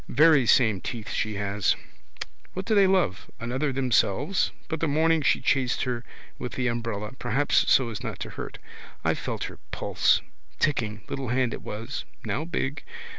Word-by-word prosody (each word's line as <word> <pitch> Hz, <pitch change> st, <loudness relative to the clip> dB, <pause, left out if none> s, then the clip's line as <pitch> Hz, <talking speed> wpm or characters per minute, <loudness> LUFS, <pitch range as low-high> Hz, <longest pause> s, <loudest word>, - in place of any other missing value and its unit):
Very 150 Hz, -2 st, +5 dB
same 110 Hz, -7 st, +4 dB
teeth 115 Hz, -4 st, -5 dB
she 110 Hz, -1 st, -1 dB
has. 100 Hz, -1 st, +1 dB, 0.8 s
What 185 Hz, +1 st, -4 dB
do 220 Hz, -, +1 dB
they 200 Hz, -2 st, +6 dB
love? 185 Hz, -, +1 dB
Another 130 Hz, +5 st, -1 dB
themselves? 130 Hz, -, +2 dB, 0.2 s
But 160 Hz, -, -3 dB
the 165 Hz, -, +1 dB
morning 160 Hz, +2 st, +3 dB
she -, -, +3 dB
chased 130 Hz, -2 st, +1 dB
her 125 Hz, -1 st, -2 dB, 0.4 s
with 125 Hz, -, -4 dB
the 130 Hz, -, -1 dB
umbrella. 115 Hz, -3 st, -3 dB
Perhaps 140 Hz, +6 st, +2 dB
so 130 Hz, -3 st, +5 dB
as 110 Hz, -3 st, -5 dB
not -, -, -4 dB
to -, -, -4 dB
hurt. -, -, -7 dB, 0.5 s
I -, -, +4 dB
felt -, -, -4 dB
her -, -, -6 dB
pulse. -, -, +2 dB, 0.4 s
Ticking. 110 Hz, -9 st, 0 dB
Little 135 Hz, -1 st, -4 dB
hand 125 Hz, 0 st, +1 dB
it -, -, -6 dB
was: 115 Hz, +6 st, -5 dB, 0.2 s
now 155 Hz, -, -1 dB
big. 145 Hz, -4 st, -2 dB
130 Hz, 170 wpm, -26 LUFS, 110-150 Hz, 0.8 s, they